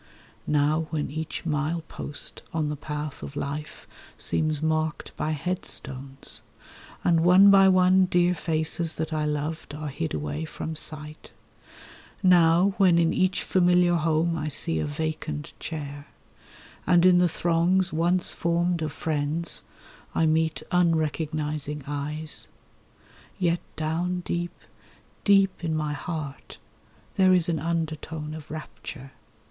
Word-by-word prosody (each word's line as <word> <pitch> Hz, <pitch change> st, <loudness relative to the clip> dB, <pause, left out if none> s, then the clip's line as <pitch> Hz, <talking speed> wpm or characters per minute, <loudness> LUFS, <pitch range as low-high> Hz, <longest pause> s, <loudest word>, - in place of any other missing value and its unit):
Now 150 Hz, +2 st, +2 dB
when 150 Hz, -4 st, -2 dB
each 160 Hz, +3 st, -5 dB
mile 155 Hz, +1 st, -1 dB
post 145 Hz, -, -3 dB
on 155 Hz, -2 st, 0 dB
the 150 Hz, -, -2 dB
path 150 Hz, 0 st, -5 dB
of 140 Hz, -, -8 dB
life 145 Hz, +2 st, -5 dB, 0.3 s
seems 155 Hz, -1 st, 0 dB
marked 155 Hz, 0 st, -1 dB
by 155 Hz, -, -2 dB
headstones, 140 Hz, -5 st, -4 dB, 0.6 s
And 170 Hz, -2 st, +4 dB
one 180 Hz, +4 st, +7 dB
by 195 Hz, -1 st, +7 dB
one 185 Hz, 0 st, +5 dB
dear 175 Hz, 0 st, +3 dB
faces 160 Hz, 0 st, 0 dB
that 160 Hz, 0 st, -3 dB
I 155 Hz, -1 st, 0 dB
loved 150 Hz, 0 st, -3 dB
are 150 Hz, 0 st, -5 dB
hid 80 Hz, -, -3 dB
away 75 Hz, +1 st, -3 dB
from 160 Hz, -, -6 dB
sight; 155 Hz, 0 st, -7 dB, 0.9 s
Now 180 Hz, +1 st, +5 dB
when 185 Hz, -4 st, +5 dB
in 165 Hz, -1 st, +3 dB
each 185 Hz, 0 st, +1 dB
familiar 180 Hz, -1 st, +3 dB
home 165 Hz, 0 st, +1 dB
I 155 Hz, -2 st, -3 dB
see 80 Hz, -, +1 dB
a -, -, -1 dB
vacant 150 Hz, 0 st, -4 dB
chair, 145 Hz, -3 st, -6 dB, 0.8 s
And 175 Hz, -1 st, +5 dB
in 180 Hz, -1 st, +6 dB
the 180 Hz, -1 st, +4 dB
throngs 175 Hz, +3 st, +1 dB
once 175 Hz, +3 st, +1 dB
formed 170 Hz, 0 st, 0 dB
of 155 Hz, -2 st, -2 dB
friends 155 Hz, +2 st, -1 dB, 0.5 s
I 165 Hz, -, +3 dB
meet 160 Hz, 0 st, +1 dB
unrecognising 155 Hz, -3 st, 0 dB
eyes— 150 Hz, +2 st, -2 dB, 0.9 s
Yet 170 Hz, -1 st, +1 dB
down 170 Hz, +3 st, -1 dB
deep, 175 Hz, 0 st, -3 dB, 0.7 s
deep 195 Hz, -3 st, +3 dB
in 160 Hz, -2 st, 0 dB
my 150 Hz, -1 st, -1 dB
heart 150 Hz, -3 st, -6 dB, 0.6 s
there 185 Hz, -1 st, +6 dB
is 175 Hz, -2 st, +2 dB
an 165 Hz, -2 st, 0 dB
undertone 160 Hz, -1 st, -3 dB
of 155 Hz, -1 st, -9 dB
rapture. 150 Hz, -3 st, -8 dB
160 Hz, 130 wpm, -26 LUFS, 150-175 Hz, 0.9 s, one